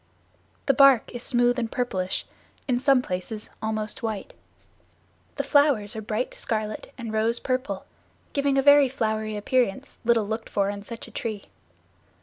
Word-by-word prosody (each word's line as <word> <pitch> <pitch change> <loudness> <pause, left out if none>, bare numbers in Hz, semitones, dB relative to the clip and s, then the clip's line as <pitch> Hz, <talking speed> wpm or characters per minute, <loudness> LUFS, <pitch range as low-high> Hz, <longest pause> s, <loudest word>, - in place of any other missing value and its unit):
The 275 - +4
bark 270 -3 +5
is 245 - -5
smooth 245 0 +2
and 230 -2 -2
purplish, 190 -7 -2 0.4
in 245 -2 +1
some 265 -1 +4
places 200 +3 -5
almost 215 -1 -3
white. 220 -3 -4 1.0
The - - -1
flowers 280 -9 +3
are 220 - -4
bright 220 +3 -2
scarlet 215 -1 -3
and 230 -3 -6
rose 225 +2 +2
purple, 255 +1 -2 0.5
giving 280 -1 +1
a 270 - +3
very 285 -1 +7
flowery 220 -3 -2
appearance 250 +3 -1
little 230 -3 +3
looked 220 +1 -4
for 200 0 +1
in 200 0 -7
such 230 +3 -8
a - - -13
tree. 215 -2 -5
230 Hz, 150 wpm, -25 LUFS, 215-255 Hz, 1.0 s, very